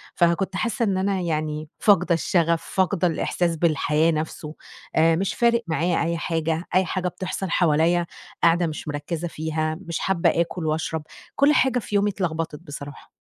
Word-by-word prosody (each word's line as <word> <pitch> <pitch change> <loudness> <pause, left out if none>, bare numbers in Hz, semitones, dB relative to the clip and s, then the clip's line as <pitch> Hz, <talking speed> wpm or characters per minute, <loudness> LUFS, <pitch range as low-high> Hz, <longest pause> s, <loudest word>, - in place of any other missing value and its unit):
فكنت 175 +2 +1
حاسّة 235 +4 -1
إن 195 -2 0
أنا 195 0 0
يعني 155 -2 -2
فاقدة 185 -4 +4
الشغف، 170 0 +1
فاقدة 185 -1 +2
الإحساس 170 +1 0
بالحياة 155 0 +2
نفْسه، 155 0 -4 0.4
آآ 165 +1 +4
مش 190 +3 -1
فارق 235 0 +2
معايا 165 +1 +1
أي 170 0 -1
حاجة، 165 0 -1
أي 185 0 +4
حاجة 185 +1 -2
بتحصل 185 +1 -4
حواليّا 170 +1 +3 0.4
قاعدة 170 0 +4
مش 155 0 -6
مركّزة 150 +3 -3
فيها، 155 -1 -2
مش 170 - -2
حابة 190 -3 +2
آكل 170 0 -3
واشرب، 155 0 -2 0.3
كلّ 285 +2 +4
حاجة 255 -3 +3
في 210 - -5
يومي 205 +1 +3
اتلخبطت 165 -6 -3
بصراحة. 145 -3 -9
170 Hz, 160 wpm, -24 LUFS, 160-185 Hz, 0.4 s, فاقدة